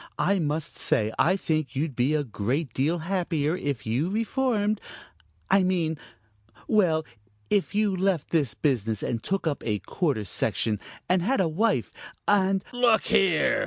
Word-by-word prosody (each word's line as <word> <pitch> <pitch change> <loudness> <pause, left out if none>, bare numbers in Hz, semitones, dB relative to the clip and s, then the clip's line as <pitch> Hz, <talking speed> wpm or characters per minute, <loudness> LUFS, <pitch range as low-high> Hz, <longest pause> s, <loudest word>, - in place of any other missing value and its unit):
I 200 +1 +2
must 155 0 -2
say 110 0 +1
I 180 +5 +4
think 155 -6 -2
you'd 145 0 -2
be 130 +6 +2
a 150 - +1
great 125 +4 -2
deal 150 +6 +1
happier 170 -3 -1
if 140 -9 -3
you 125 +10 0
reformed 215 -1 0 0.7
I 195 0 +6
mean 175 -4 +1 0.7
well, 170 -7 +2 0.5
if 200 0 +1
you 210 -2 +2
left 185 -4 0
this 140 -10 +1
business, 115 -7 0
and 115 -2 -2
took 195 +6 -2
up 150 -4 -1
a 105 -2 0
quarter 140 - -1
section, 105 +1 0 0.3
and 180 0 +2
had 255 +10 +1
a 185 - +3
wife 160 - 0 0.3
and 195 -1 +3
" - - -19
"Look 245 -3 +3
here!" 195 - +3
165 Hz, 160 wpm, -26 LUFS, 135-195 Hz, 0.7 s, I